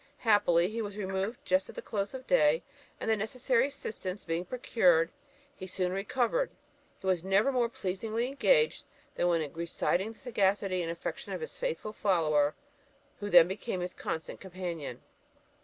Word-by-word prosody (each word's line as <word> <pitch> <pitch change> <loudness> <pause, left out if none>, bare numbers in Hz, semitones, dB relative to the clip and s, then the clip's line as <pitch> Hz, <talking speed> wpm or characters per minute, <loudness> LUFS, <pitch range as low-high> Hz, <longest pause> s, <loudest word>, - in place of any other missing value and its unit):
Happily 190 -6 +4
he 225 +3 -3
was 205 -1 -5
removed 195 +3 -2
just 185 +1 +2
at - - -10
the - - -5
close 205 +2 -3
of 260 0 -7
day; 150 - +4 0.4
and - - -4
the 220 - +4
necessary 240 +4 +1
assistance 210 -8 -5
being 165 +2 -2
procured, 180 -7 +3 0.4
he 185 - -8
soon 185 0 -1
recovered. 255 - 0 0.5
He - - -13
was 185 -3 +1
never 195 +7 +3
more 245 -3 +2
pleasingly 220 +3 -2
engaged 460 - +2 0.3
than 175 - +1
when 165 -4 0
reciting 175 +5 -1
the - - -23
sagacity 195 -6 +1
and 165 -1 -2
affection 170 - -5
of - - -4
his 470 - -5
faithful 485 - -3
follower, 155 -8 +2 0.6
who 205 - -4
then 175 -3 +8
became 190 0 -3
his 180 0 -4
constant 160 - -5
companion. 180 -5 -6
195 Hz, 160 wpm, -31 LUFS, 175-230 Hz, 0.6 s, then